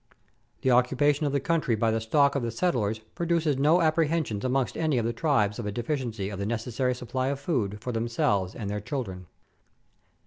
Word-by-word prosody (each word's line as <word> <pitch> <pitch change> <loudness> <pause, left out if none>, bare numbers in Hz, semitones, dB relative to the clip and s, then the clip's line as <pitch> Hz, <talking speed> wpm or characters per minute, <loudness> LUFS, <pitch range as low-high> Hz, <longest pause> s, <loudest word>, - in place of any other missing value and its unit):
The 130 - +3
occupation 135 +4 +3
of - - -1
the 140 - +1
country 155 -5 +1
by 110 +1 +1
the 110 0 0
stock 140 +5 +3
of 140 - -1
the 120 - -2
settlers 115 - 0 0.2
produces 165 -5 0
no 155 +5 +4
apprehensions 155 -8 +1
amongst 130 0 0
any 155 -5 +1
of 115 - 0
the 120 - 0
tribes 115 -7 +1
of 110 - -3
a - - -2
deficiency 120 -4 -3
of 100 -2 -6
the 100 - -2
necessary 120 +3 -1
supply 130 +1 -3
of 140 0 -1
food 110 - -1
for 125 - -3
themselves 115 -5 0
and 105 - -5
their 105 +1 -3
children. 95 - -5
125 Hz, 195 wpm, -27 LUFS, 110-145 Hz, 0.2 s, no